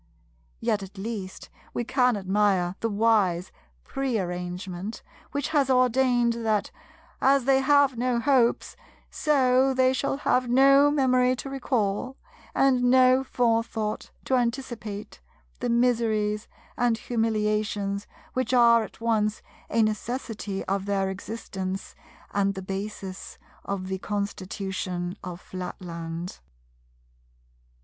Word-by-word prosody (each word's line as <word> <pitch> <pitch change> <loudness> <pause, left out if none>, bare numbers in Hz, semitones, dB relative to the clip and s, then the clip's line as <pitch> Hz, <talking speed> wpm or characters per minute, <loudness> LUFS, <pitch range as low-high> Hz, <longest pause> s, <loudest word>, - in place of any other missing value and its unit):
Yet 205 - 0
at 195 +1 -10
least 195 -2 -6 0.3
we 240 - 0
can 250 -1 +2
admire 190 -2 +1
the 230 - -1
wise 200 -5 +2 0.3
Prearrangement 185 -5 -3 0.3
which 285 0 -2
has 285 -4 +2
ordained 250 -1 +3
that, 215 -2 0 0.5
as 270 -1 +4
they 270 0 +4
have 280 -1 +4
no 245 -1 +1
hopes, 250 -2 +2 0.4
so 265 -2 +3
they 260 0 +4
shall 275 +1 -1
have 250 -3 +1
no 275 +3 +6
memory 255 -3 +3
to 270 +2 -7
recall, 250 -2 -1 0.4
and 265 -2 +3
no 255 +1 +5
forethought 230 -4 -1 0.2
to - - -1
anticipate, 235 - -4 0.4
the - - -2
miseries 225 -3 +1 0.3
and 240 -2 +2
humiliations 215 -3 -1 0.3
which 255 0 0
are 235 -1 +6
at 220 - -9
once 220 -2 0 0.3
a 225 0 +3
necessity 215 -2 -3
of 195 0 -2
their 195 -1 0
existence 190 -2 -5 0.4
and 200 -1 +1
the 190 - -6
basis 195 0 -6 0.3
of 195 -2 -3
the 190 0 -3
constitution 190 -3 -3
of 180 -1 -6
Flatland. 175 -2 -6
225 Hz, 110 wpm, -26 LUFS, 195-255 Hz, 0.5 s, no